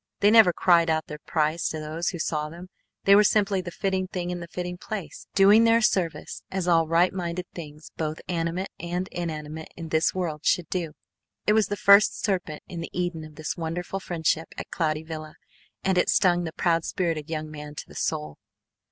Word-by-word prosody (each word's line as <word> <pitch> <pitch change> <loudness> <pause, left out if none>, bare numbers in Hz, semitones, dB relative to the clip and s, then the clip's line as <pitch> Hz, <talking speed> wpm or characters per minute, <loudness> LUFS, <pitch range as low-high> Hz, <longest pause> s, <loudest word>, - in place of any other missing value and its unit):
They 205 - +6
never 220 -5 +8
cried 170 -1 +4
out 160 0 +1
their 150 -1 -8
price 155 +1 +1
to 155 - -4
those 155 +3 -2
who 175 - -5
saw 150 -2 -2
them, 175 +3 -11 0.3
they 200 - +7
were 210 - +7
simply 200 -2 +2
the 180 - -6
fitting 190 +1 -1
thing 180 -1 -4
in 175 - -3
the 170 - -7
fitting 180 +1 -5
place, 190 -9 -6
doing 200 +3 +7
their 230 0 +5
service 185 -7 0
as 190 -2 -2
all 165 -2 +4
right 170 +3 +3
minded 180 -1 -3
things 150 -2 -10
both 155 0 -3
animate 175 +2 -2
and 175 +2 -3
inanimate 160 -2 -5
in 165 -1 -6
this 160 +1 +2
world 160 -5 -3
should 180 - +2
do. 170 -4 -2 0.5
It 210 - +4
was 220 -1 +3
the 205 - -3
first 200 +2 +6
serpent 180 -7 -2
in 170 -2 -6
the 165 - -5
Eden 175 -3 -2
of 155 -1 -12
this 155 0 -4
wonderful 175 +3 -4
friendship 165 -3 -1
at - - -7
Cloudy 155 -3 -1
Villa 155 -1 -7 0.5
and 190 -1 +2
it - - +2
stung 175 -3 +3
the 160 - -5
proud 165 -2 +1
spirited 165 -5 -2
young 155 -1 -4
man 150 -1 -8
to - - -7
the - - -14
soul. 75 0 -3
170 Hz, 205 wpm, -26 LUFS, 160-185 Hz, 0.5 s, never